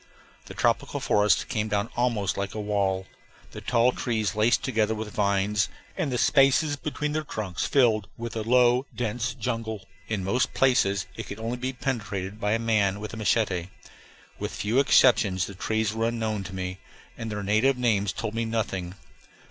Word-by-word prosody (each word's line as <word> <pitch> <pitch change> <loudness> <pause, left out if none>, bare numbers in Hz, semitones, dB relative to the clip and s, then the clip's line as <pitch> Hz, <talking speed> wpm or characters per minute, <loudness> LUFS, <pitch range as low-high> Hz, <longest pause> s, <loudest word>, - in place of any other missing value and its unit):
The - - -9
tropical - - +1
forest 105 0 +2
came 110 -3 -1
down 105 +1 -1
almost 115 -5 0
like 100 +1 -3
a - - -3
wall, 100 -2 0 0.5
the - - -8
tall 120 +1 +3
trees 110 -4 -1
laced 110 +3 +2
together 110 -4 +1
with 110 -1 -6
vines, 100 -1 +1 0.3
and 165 -8 -1
the 125 - 0
spaces 140 +4 +4
between 150 0 -3
their 155 +1 0
trunks 105 -10 -3
filled 115 -7 +3
with 115 0 -6
a 110 - -1
low, 125 +3 +3
dense 120 +1 -2
jungle. 115 -4 -3 0.2
In 105 -4 -2
most 125 +8 0
places 100 -7 +3
it - - -6
could 100 - -6
only 115 +2 -3
be 130 +1 -2
penetrated 105 -6 -4
by 105 -1 +1
a - - +3
man 105 -4 +1
with 105 +1 -6
a - - -4
machete. 100 -4 0 0.7
With - - -4
few 110 +6 +1
exceptions 110 -9 +4
the 100 - -8
trees 110 +2 -1
were 115 +1 0
unknown 110 -4 -2
to 95 - -7
me, 90 0 -4 0.4
and 115 -1 -5
their 105 -1 -3
native 110 +7 +3
names 105 -5 +1
told 110 +1 -4
me 115 0 -1
nothing. 100 -5 -2
110 Hz, 180 wpm, -26 LUFS, 100-120 Hz, 0.7 s, spaces